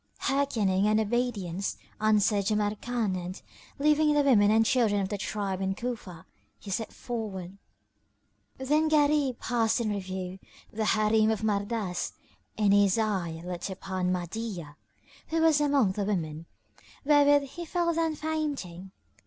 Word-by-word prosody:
"Hearkening 215 Hz, -8 st, +1 dB
and 215 Hz, +1 st, +3 dB
obedience," 210 Hz, -5 st, -1 dB, 0.2 s
answered 210 Hz, -1 st, +2 dB
Jamrkan 215 Hz, 0 st, -1 dB
and, 180 Hz, +1 st, -5 dB, 0.4 s
leaving 300 Hz, +1 st, +3 dB
the 290 Hz, -, +4 dB
women 215 Hz, -7 st, +5 dB
and 225 Hz, +1 st, +4 dB
children 225 Hz, -5 st, +2 dB
of 190 Hz, -1 st, -2 dB
the 205 Hz, -, -2 dB
tribe 195 Hz, -2 st, -3 dB
in 190 Hz, 0 st, -1 dB
Cufa, 215 Hz, -8 st, -6 dB, 0.3 s
he 200 Hz, -, -9 dB
set 220 Hz, +3 st, -2 dB
forward. 200 Hz, -6 st, -6 dB, 1.0 s
Then 300 Hz, +4 st, +1 dB
Gharib 290 Hz, -4 st, +2 dB
passed 230 Hz, -1 st, 0 dB
in 220 Hz, -3 st, -1 dB
review 185 Hz, -2 st, -5 dB, 0.3 s
the 220 Hz, 0 st, -1 dB
Harim 215 Hz, 0 st, +3 dB
of 220 Hz, -1 st, -1 dB
Mardas 205 Hz, -3 st, -1 dB, 0.4 s
and 205 Hz, -2 st, +3 dB
his 200 Hz, 0 st, +4 dB
eye 185 Hz, -7 st, -1 dB
lit 180 Hz, +2 st, -4 dB
upon 185 Hz, -1 st, -3 dB
Mahdiyah, 180 Hz, -3 st, -4 dB, 0.5 s
who 325 Hz, -, -1 dB
was 320 Hz, -2 st, +4 dB
among 280 Hz, -8 st, +3 dB
the 200 Hz, +2 st, -2 dB
women, 165 Hz, -5 st, -3 dB, 0.6 s
wherewith 285 Hz, -1 st, +4 dB
he 345 Hz, -, -6 dB
fell 340 Hz, 0 st, 0 dB
down 325 Hz, -1 st, 0 dB
fainting. 285 Hz, -, -4 dB
215 Hz, 135 wpm, -28 LUFS, 190-265 Hz, 1.0 s, women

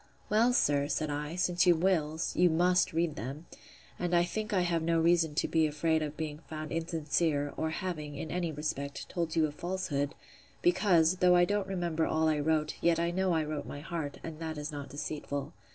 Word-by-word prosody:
Well, 225 Hz, +4 st, +4 dB
sir, 145 Hz, -11 st, +2 dB
said 155 Hz, +1 st, -1 dB
I, 150 Hz, +3 st, -3 dB
since 180 Hz, 0 st, +2 dB
you 175 Hz, -, +7 dB
will, 160 Hz, -3 st, +1 dB
you 180 Hz, 0 st, +4 dB
must 180 Hz, +3 st, +3 dB
read 165 Hz, -1 st, 0 dB
them; 140 Hz, +7 st, -6 dB, 0.5 s
and 175 Hz, 0 st, 0 dB
I 170 Hz, -, +5 dB
think 215 Hz, +5 st, -3 dB
I 190 Hz, -3 st, +2 dB
have 170 Hz, -2 st, +1 dB
no 165 Hz, 0 st, +2 dB
reason 165 Hz, -2 st, +3 dB
to -, -, +1 dB
be 160 Hz, -1 st, +2 dB
afraid 160 Hz, +2 st, +1 dB
of 150 Hz, 0 st, -4 dB
being 155 Hz, -2 st, -4 dB
found 155 Hz, 0 st, -6 dB
insincere, 155 Hz, -3 st, 0 dB
or 160 Hz, -, -1 dB
having, 155 Hz, -3 st, -4 dB
in 145 Hz, +2 st, -5 dB
any 175 Hz, -2 st, -1 dB
respect, 140 Hz, -2 st, -4 dB
told 170 Hz, -2 st, -2 dB
you 160 Hz, -1 st, +4 dB
a 150 Hz, -, -3 dB
falsehood; 150 Hz, -4 st, -2 dB, 0.5 s
because, 185 Hz, -, +4 dB
though 180 Hz, 0 st, +5 dB
I 175 Hz, 0 st, +6 dB
don't 205 Hz, 0 st, -1 dB
remember 170 Hz, -4 st, -1 dB
all 160 Hz, 0 st, +1 dB
I 155 Hz, -1 st, +2 dB
wrote, 155 Hz, 0 st, 0 dB
yet 170 Hz, -1 st, +3 dB
I 170 Hz, 0 st, +1 dB
know 185 Hz, 0 st, +1 dB
I 160 Hz, -1 st, +2 dB
wrote 150 Hz, -1 st, -4 dB
my 145 Hz, -, -7 dB
heart; 155 Hz, -2 st, -4 dB
and 160 Hz, -1 st, -7 dB
that 160 Hz, -1 st, -4 dB
is 150 Hz, +1 st, -4 dB
not 145 Hz, -1 st, -6 dB
deceitful. 145 Hz, 0 st, -4 dB
160 Hz, 205 wpm, -31 LUFS, 150-175 Hz, 0.5 s, you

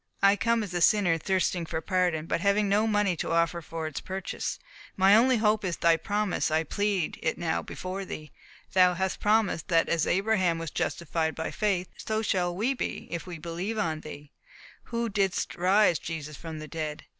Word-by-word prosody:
I 200 Hz, +1 st, +6 dB
come 230 Hz, +1 st, +1 dB
as 195 Hz, -4 st, -7 dB
a 175 Hz, -, -1 dB
sinner, 175 Hz, -3 st, +4 dB
thirsting 185 Hz, -1 st, 0 dB
for 160 Hz, -, -2 dB
pardon, 175 Hz, -2 st, 0 dB
but 165 Hz, 0 st, -1 dB
having 200 Hz, +1 st, +2 dB
no 210 Hz, +3 st, +2 dB
money 205 Hz, -4 st, +2 dB
to -, -, -3 dB
offer 170 Hz, +1 st, +1 dB
for 165 Hz, 0 st, -5 dB
its 155 Hz, -3 st, -4 dB
purchase. 190 Hz, 0 st, -4 dB, 0.4 s
My 195 Hz, +2 st, +6 dB
only 250 Hz, +3 st, +5 dB
hope 215 Hz, 0 st, +2 dB
is 180 Hz, -3 st, -1 dB
in -, -, -23 dB
Thy 170 Hz, -1 st, +5 dB
promise. 205 Hz, +3 st, -1 dB
I 160 Hz, +1 st, +1 dB
plead 200 Hz, -1 st, -1 dB
it 160 Hz, -, -1 dB
now 165 Hz, -2 st, -1 dB
before 185 Hz, +2 st, -5 dB
Thee. 155 Hz, -5 st, -8 dB, 0.4 s
Thou 180 Hz, -1 st, +5 dB
hast 190 Hz, +1 st, -2 dB
promised, 210 Hz, -5 st, +1 dB
that 165 Hz, -2 st, +3 dB
as 165 Hz, -2 st, +1 dB
Abraham 190 Hz, -3 st, +2 dB
was 165 Hz, -2 st, -5 dB
justified 160 Hz, -1 st, -1 dB
by 160 Hz, -, -3 dB
faith, 195 Hz, -4 st, 0 dB
so 220 Hz, 0 st, -2 dB
shall 175 Hz, -4 st, 0 dB
we 230 Hz, +8 st, +1 dB
be, 265 Hz, -, -4 dB
if 170 Hz, +1 st, -4 dB
we 175 Hz, -2 st, -6 dB
believe 175 Hz, +7 st, -4 dB
on 160 Hz, -7 st, -1 dB
Thee, 145 Hz, -2 st, -10 dB, 0.5 s
who 235 Hz, 0 st, -2 dB
didst 195 Hz, -3 st, 0 dB
raise 185 Hz, -1 st, +3 dB
Jesus 155 Hz, -2 st, -6 dB
from 160 Hz, 0 st, -7 dB
the 155 Hz, 0 st, -7 dB
dead. 155 Hz, -1 st, -5 dB
180 Hz, 195 wpm, -28 LUFS, 165-205 Hz, 0.5 s, I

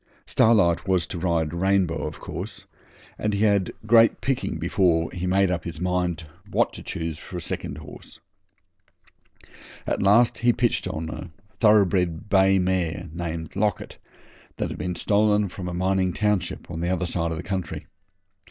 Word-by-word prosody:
Starlight 100 Hz, -7 st, +3 dB
was 90 Hz, -3 st, +2 dB
to 90 Hz, -, -6 dB
ride 85 Hz, -3 st, 0 dB
Rainbow, 90 Hz, -3 st, +1 dB
of 75 Hz, -, -8 dB
course, 100 Hz, +2 st, -7 dB, 0.5 s
and 105 Hz, -1 st, 0 dB
he 100 Hz, -, -1 dB
had 100 Hz, -3 st, +2 dB
great 115 Hz, +1 st, +5 dB
picking 135 Hz, -9 st, -1 dB
before 85 Hz, -1 st, +1 dB
he 90 Hz, 0 st, -4 dB
made 95 Hz, 0 st, +3 dB
up 90 Hz, -2 st, -2 dB
his 85 Hz, -2 st, -7 dB
mind 90 Hz, -2 st, -1 dB, 0.3 s
what -, -, +1 dB
to -, -, -9 dB
choose 80 Hz, -1 st, -4 dB
for 90 Hz, 0 st, -7 dB
second -, -, -5 dB
horse. -, -, -12 dB, 1.7 s
At -, -, -1 dB
last 110 Hz, +5 st, +4 dB
he 120 Hz, +1 st, +3 dB
pitched 120 Hz, -1 st, 0 dB
upon 80 Hz, 0 st, -4 dB
a -, -, -7 dB, 0.3 s
thoroughbred 95 Hz, -4 st, +3 dB
bay 95 Hz, 0 st, +5 dB
mare 90 Hz, -3 st, -1 dB
named 85 Hz, -1 st, -5 dB
Locket 105 Hz, +1 st, -1 dB, 0.6 s
that -, -, -2 dB
had -, -, -7 dB
been 90 Hz, -1 st, -3 dB
stolen 105 Hz, 0 st, +2 dB
from 90 Hz, 0 st, -7 dB
a -, -, -5 dB
mining 95 Hz, 0 st, +1 dB
township 105 Hz, -5 st, -1 dB
the 85 Hz, 0 st, -3 dB
other 90 Hz, -1 st, 0 dB
side 85 Hz, -1 st, -1 dB
of 80 Hz, -, -3 dB
the 85 Hz, -, -5 dB
country. 95 Hz, -4 st, -4 dB
90 Hz, 160 wpm, -24 LUFS, 85-100 Hz, 1.7 s, great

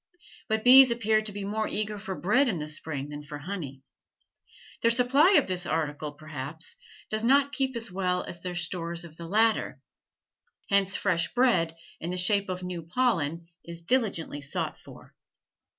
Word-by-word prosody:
But 220 Hz, 0 st, 0 dB
bees 260 Hz, +1 st, +9 dB
appear 220 Hz, -2 st, +2 dB
to 215 Hz, -1 st, -5 dB
be 205 Hz, 0 st, -6 dB
more 215 Hz, +2 st, -1 dB
eager 210 Hz, 0 st, -3 dB
for 195 Hz, -1 st, -5 dB
bread 250 Hz, +10 st, +3 dB
in 205 Hz, -8 st, 0 dB
the 150 Hz, -1 st, -5 dB
spring 150 Hz, -2 st, -3 dB
than 145 Hz, 0 st, -7 dB
for 145 Hz, 0 st, -8 dB
honey; 145 Hz, -5 st, -7 dB, 1.0 s
their 230 Hz, -, +4 dB
supply 260 Hz, +9 st, +4 dB
of 300 Hz, -7 st, +5 dB
this 180 Hz, -1 st, -2 dB
article, 150 Hz, -2 st, -2 dB
perhaps, 155 Hz, +1 st, -6 dB, 0.4 s
does 215 Hz, +1 st, -1 dB
not 280 Hz, +3 st, +4 dB
keep 265 Hz, -2 st, -1 dB
as 230 Hz, -2 st, -3 dB
well 180 Hz, -1 st, -1 dB
as 175 Hz, -, -8 dB
their 180 Hz, 0 st, -5 dB
stores 170 Hz, 0 st, -3 dB
of 160 Hz, -2 st, -13 dB
the 170 Hz, -, -8 dB
latter, 220 Hz, +4 st, +1 dB, 0.9 s
hence 195 Hz, -1 st, +3 dB
fresh 175 Hz, -4 st, 0 dB
bread, 195 Hz, -10 st, +2 dB, 0.2 s
in 170 Hz, -, -5 dB
the 180 Hz, -, -3 dB
shape 200 Hz, +2 st, +2 dB
of 185 Hz, 0 st, -4 dB
new 180 Hz, -2 st, -4 dB
pollen, 170 Hz, -, 0 dB, 0.2 s
is 170 Hz, 0 st, -10 dB
diligently 195 Hz, -, 0 dB
sought 140 Hz, -, -3 dB
for. -, -, -15 dB
185 Hz, 170 wpm, -27 LUFS, 165-220 Hz, 1.0 s, bees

